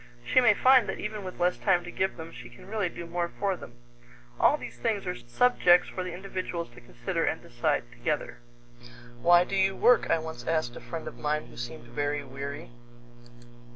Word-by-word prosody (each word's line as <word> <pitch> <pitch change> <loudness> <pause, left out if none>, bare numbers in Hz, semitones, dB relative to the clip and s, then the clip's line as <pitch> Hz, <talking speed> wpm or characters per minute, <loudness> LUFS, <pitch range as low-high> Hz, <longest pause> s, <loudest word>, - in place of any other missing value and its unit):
She 255 - +5
may 225 -4 +5
find 255 -2 +5
that - - -3
even 210 0 -4
with 185 -1 -8
less 180 +1 +1
time 180 -4 +2
to 175 - -8
give 190 0 -1
them, 165 0 -8
she 120 - -10
can 120 - -15
really 205 -3 -1
do 170 - -8
more 170 +1 -2
for 195 +2 -2
them. 120 -8 -12 0.6
All 295 - +5
these - - -9
things 220 -4 -1
are 180 - -1
subjects 175 - +3
for 185 - -4
the 180 - -5
individuals 180 -2 -4
to 120 0 -14
consider 120 +8 -3
and 160 - 0
decide 120 0 -1
together. 120 +6 -3 0.8
"Why 175 +3 +6
do 195 - -4
you 190 0 +2
work?" 245 - +4
I - - +4
once 160 -6 -7
asked 155 -7 0
a - - -8
friend 165 -1 -6
of - - -8
mine 150 +1 -1
who - - -15
seemed 120 0 -7
very 145 +4 -2
weary. 140 0 -7
170 Hz, 200 wpm, -28 LUFS, 140-190 Hz, 0.8 s, Why